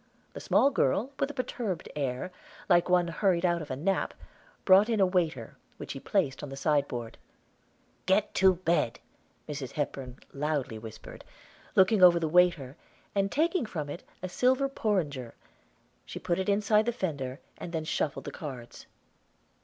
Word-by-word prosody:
The -, -, -7 dB
small 280 Hz, -, +3 dB
girl, 225 Hz, -, +1 dB
with 275 Hz, -, +1 dB
a -, -, -6 dB
perturbed 225 Hz, -8 st, -3 dB
air, 140 Hz, +4 st, -2 dB, 0.4 s
like 175 Hz, -1 st, +4 dB
one 180 Hz, -1 st, +4 dB
hurried 175 Hz, 0 st, +1 dB
out 170 Hz, -1 st, +1 dB
of 150 Hz, -, -8 dB
a 130 Hz, -, -2 dB
nap, 190 Hz, +8 st, -1 dB, 0.5 s
brought 195 Hz, +4 st, +6 dB
in 225 Hz, -2 st, +1 dB
a 195 Hz, -, +6 dB
waiter, 165 Hz, -, -1 dB, 0.2 s
which -, -, -7 dB
she 135 Hz, -, -6 dB
placed 150 Hz, -5 st, 0 dB
on 145 Hz, -, -6 dB
the 135 Hz, -, -7 dB
sideboard. 140 Hz, -6 st, -1 dB, 0.9 s
"Get 195 Hz, +2 st, +2 dB
to 190 Hz, -1 st, +5 dB
bed," 170 Hz, -9 st, 0 dB, 0.5 s
Mrs. 140 Hz, -3 st, -5 dB
Hepburn 135 Hz, -3 st, -4 dB, 0.2 s
loudly 140 Hz, -6 st, -2 dB
whispered, 110 Hz, -1 st, -10 dB, 0.5 s
looking 190 Hz, +2 st, +5 dB
over 175 Hz, -1 st, +8 dB
the 165 Hz, -, 0 dB
waiter, 170 Hz, -5 st, +3 dB, 0.4 s
and 195 Hz, 0 st, 0 dB
taking 325 Hz, -, +1 dB
from 150 Hz, -7 st, -4 dB
it 170 Hz, -, -7 dB, 0.2 s
a -, -, -1 dB
silver 255 Hz, +8 st, +2 dB
porringer, 160 Hz, -, -2 dB, 0.7 s
she -, -, -8 dB
put 175 Hz, +1 st, -1 dB
it 190 Hz, -, -1 dB
inside 210 Hz, +2 st, +3 dB
the -, -, +3 dB
fender, 140 Hz, -, -3 dB, 0.2 s
and 170 Hz, -, -6 dB
then 160 Hz, -2 st, -3 dB
shuffled 155 Hz, -2 st, -2 dB
the -, -, -5 dB
cards. 130 Hz, -6 st, -9 dB
175 Hz, 160 wpm, -29 LUFS, 140-195 Hz, 0.9 s, over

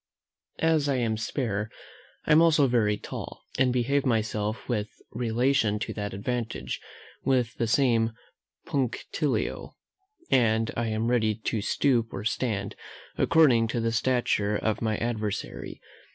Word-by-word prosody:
As 160 Hz, -3 st, +2 dB
I 140 Hz, -, +2 dB
am 115 Hz, -3 st, 0 dB
spare, 110 Hz, -2 st, -2 dB, 0.6 s
I -, -, 0 dB
am 155 Hz, +2 st, +7 dB
also 160 Hz, -4 st, +5 dB
very 110 Hz, -5 st, +2 dB
tall, -, -, -8 dB, 0.2 s
and 130 Hz, -1 st, +4 dB
behave 130 Hz, +3 st, +1 dB
myself 110 Hz, -2 st, -1 dB
with 110 Hz, -4 st, -1 dB, 0.2 s
relation 120 Hz, -1 st, +1 dB
to 105 Hz, -, -4 dB
that 105 Hz, -1 st, -4 dB
advantage 115 Hz, +3 st, -3 dB, 0.4 s
with 125 Hz, -3 st, +1 dB
the 115 Hz, -, +1 dB
same 115 Hz, -2 st, +2 dB, 0.5 s
punctilio; 130 Hz, -4 st, -2 dB, 0.6 s
and 115 Hz, -3 st, +3 dB
I 115 Hz, 0 st, -1 dB
am 110 Hz, +2 st, 0 dB
ready 110 Hz, -3 st, +2 dB
to 110 Hz, 0 st, -2 dB
stoop 120 Hz, +1 st, +2 dB
or 95 Hz, -, -4 dB
stand, 105 Hz, -4 st, -1 dB, 0.4 s
according 130 Hz, -9 st, +4 dB
to 115 Hz, +1 st, -2 dB
the 115 Hz, 0 st, 0 dB
stature 115 Hz, -3 st, +1 dB
of 110 Hz, 0 st, -1 dB
my 110 Hz, -2 st, 0 dB
adversary. 110 Hz, -3 st, -3 dB
115 Hz, 135 wpm, -27 LUFS, 110-125 Hz, 0.6 s, am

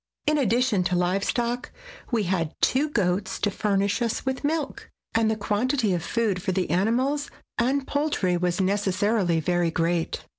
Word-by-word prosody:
In 305 Hz, 0 st, +2 dB
addition 240 Hz, -5 st, +2 dB
to 180 Hz, -, +1 dB
live 180 Hz, +2 st, +1 dB
stock, 240 Hz, 0 st, -1 dB, 0.4 s
we 230 Hz, -4 st, +1 dB
had 170 Hz, -4 st, -1 dB
two 285 Hz, +4 st, +2 dB
goats 195 Hz, -6 st, 0 dB
to 205 Hz, -, 0 dB
furnish 200 Hz, +1 st, 0 dB
us 235 Hz, +2 st, -1 dB
with 265 Hz, +1 st, -2 dB
milk, 300 Hz, -1 st, -2 dB, 0.2 s
and 225 Hz, -1 st, +3 dB
the 220 Hz, -, +1 dB
quantity 215 Hz, +1 st, 0 dB
of 175 Hz, -, -1 dB
food 210 Hz, -2 st, 0 dB
for 190 Hz, -, -1 dB
the 185 Hz, -3 st, -1 dB
animals 255 Hz, -, +1 dB, 0.3 s
and 265 Hz, +3 st, +1 dB
poultry 285 Hz, -13 st, 0 dB
was 175 Hz, +1 st, 0 dB
necessarily 195 Hz, -1 st, +1 dB
very 175 Hz, +1 st, +1 dB
great. 165 Hz, 0 st, -1 dB
205 Hz, 160 wpm, -25 LUFS, 180-250 Hz, 0.4 s, and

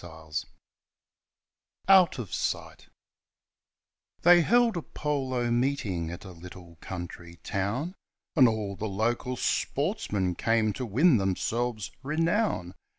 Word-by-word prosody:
i74 80 Hz, -2 st, -6 dB, 1.4 s
OUT 190 Hz, -3 st, +6 dB
OF 115 Hz, -7 st, -6 dB
SIGHT -, -, -3 dB, 1.4 s
They 175 Hz, 0 st, +8 dB
held 235 Hz, +4 st, +3 dB
a 170 Hz, -, -2 dB
polo 130 Hz, -6 st, -2 dB
meeting 120 Hz, -10 st, 0 dB
at 85 Hz, +4 st, -8 dB
a 95 Hz, -, -9 dB
little 85 Hz, -1 st, -12 dB
country 85 Hz, -1 st, -7 dB
town, 105 Hz, -, -2 dB, 0.4 s
And 130 Hz, -6 st, +7 dB
all 105 Hz, -3 st, -2 dB
the 110 Hz, -, -4 dB
local 120 Hz, +5 st, -1 dB
sportsmen 110 Hz, -, -1 dB
came 110 Hz, +2 st, +1 dB
to 125 Hz, +5 st, -4 dB
win 135 Hz, -, +4 dB
themselves 110 Hz, +3 st, -1 dB
renown. 160 Hz, -, 0 dB
115 Hz, 110 wpm, -28 LUFS, 95-145 Hz, 1.4 s, They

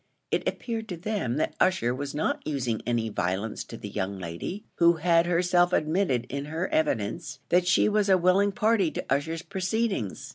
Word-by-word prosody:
It -, -, 0 dB
appeared 225 Hz, -2 st, -5 dB
to 180 Hz, -, -4 dB
them 185 Hz, -, -2 dB
that 155 Hz, -, 0 dB
Ussher 125 Hz, -10 st, +2 dB
was 140 Hz, +2 st, -5 dB
not 155 Hz, -, 0 dB
using 125 Hz, -7 st, -2 dB
any 120 Hz, -2 st, 0 dB
violence 100 Hz, +2 st, -2 dB
to 115 Hz, -, -9 dB
the 105 Hz, -, -7 dB
young 100 Hz, -1 st, -3 dB
lady, 90 Hz, -, -6 dB
who 170 Hz, 0 st, +6 dB
had 170 Hz, +1 st, +3 dB
herself 175 Hz, +1 st, +3 dB
admitted 155 Hz, -6 st, +1 dB
in 140 Hz, +2 st, -4 dB
her 160 Hz, +5 st, -2 dB
evidence, 110 Hz, -10 st, -1 dB
that 180 Hz, 0 st, +3 dB
she 175 Hz, -, +4 dB
was 210 Hz, -1 st, +2 dB
a 190 Hz, -, +6 dB
willing 185 Hz, +3 st, +3 dB
party 215 Hz, -4 st, +2 dB
to -, -, -5 dB
Ussher's 160 Hz, +4 st, -2 dB
proceedings. 190 Hz, -, -2 dB
165 Hz, 180 wpm, -27 LUFS, 120-185 Hz, -, who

